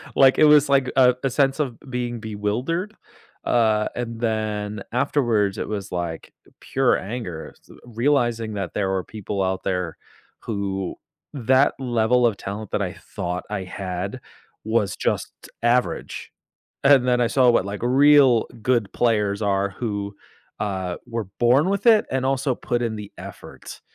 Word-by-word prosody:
Like, 135 -1 +6
it 155 - +6
was 150 -1 +6
like 135 -2 +3
a 125 -2 +5
a 135 - +1
sense 135 +2 +1
of 130 -6 -2
being 120 -1 -3
bewildered. 120 - -3 0.5
Uh, 110 -3 +2
and 115 -2 -4
then 105 -2 -2
afterwards, 115 -5 +1
it - - -3
was 100 -2 -5
like 85 -2 -4 0.3
pure 135 -2 +1
anger, 95 -6 -6
s - - -29
uh, - - -14
realizing 120 -2 0
that 95 -3 -4
there 100 -2 0
were 95 -1 -1
people 105 -1 -5
out 95 0 -2
there 90 -3 -2 0.5
who 95 -3 -3 0.4
that 130 +1 +3
level 120 -1 +2
of 110 -4 -2
talent 100 +1 -6
that - - 0
I - - -2
thought 90 +1 -5
I 105 -2 -3
had 95 +1 -5 0.4
was 110 -3 0
just - - -1 0.3
average, 120 +1 0 0.5
and 135 -2 +5
then 125 -1 +3
I 120 - +3
saw 125 +1 +4
what, 105 - +2
like, 100 0 -5
real 135 -1 +5 0.2
good 115 -3 +1
players 105 -3 +1
are 100 -1 +1
who, 100 -4 -3 0.4
uh, 95 -4 -3
were 115 -4 -4
born 130 +8 +4
with 200 +2 -1
it 220 -2 +6
and 130 0 0
also 135 0 +1
put 120 0 -2
in 115 -2 -1
the 105 -1 -8
effort. - - -10
115 Hz, 160 wpm, -23 LUFS, 100-130 Hz, 0.5 s, Like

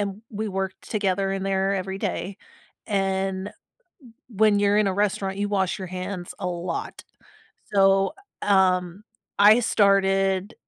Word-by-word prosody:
and 200 +1 -4
we 215 0 -4
worked 190 -1 -5
together 195 -2 0
in 195 -1 -3
there 195 0 0
every 190 0 -4
day. 195 -1 -3 0.5
And 195 -1 -1
m - - -14 0.8
when 215 -2 +3
you're 205 +1 +3
in 215 - +3
a 190 - 0
restaurant, 195 -1 -1
you 205 0 -1
wash 195 0 0
your 185 - -6
hands 185 0 -6
a 195 - -4
lot. 175 0 -5 0.7
So, 195 0 +4 0.3
uh, - - -4
um, 185 0 +1 0.4
I 210 +3 +7
started 195 -2 +2
195 Hz, 145 wpm, -24 LUFS, 190-205 Hz, 0.8 s, I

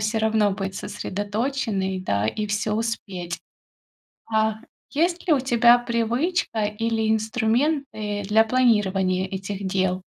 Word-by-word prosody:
всё 215 +1 0
равно 220 -2 +2
быть 195 0 -4
сосредоточенной, 205 0 -2
да, 105 - 0
и 210 - -2
всё 210 +1 -1
успеть. 195 -6 -3 1.0
А 220 0 +2 0.3
есть 340 +4 0
ли - - +5
у 295 - +5
тебя 240 -1 +5
привычка 235 - 0
или 220 +1 -1
инструменты 220 -1 0
для 215 +2 +5
планирования 195 -6 +2
этих 195 +1 -5
дел? 185 -1 0
215 Hz, 120 wpm, -24 LUFS, 195-235 Hz, 1.0 s, ли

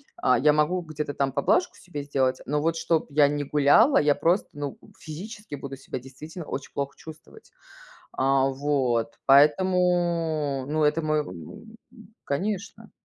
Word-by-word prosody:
а, 125 -2 +2
я 150 +2 +4
могу 150 +4 +1
где-то 155 -3 -5
там 135 -1 -1
поблажку 140 +6 +1
себе 175 -5 -7
сделать, 135 -2 0
но 150 +3 -1
вот 165 +1 0
чтоб 165 0 0
я 145 0 +5
не 145 0 -2
гуляла, 150 - +4
я 145 -1 +3
просто, 175 +4 +1
ну, 145 -2 -6 0.2
физически 205 +4 -8
буду 135 -1 -7
себя 130 - -7
действительно 150 +6 -10
очень 135 - -6
плохо 140 0 -3
чувствовать. 160 - -14 0.6
А, 135 0 +2
вот. 130 -5 -1
Поэтому, 165 -2 +2
ну, 155 +2 -1
это 150 +2 +2
мой 155 0 +1
м, 145 - -10 0.5
конечно. 200 +7 -4
150 Hz, 145 wpm, -25 LUFS, 140-170 Hz, 0.6 s, я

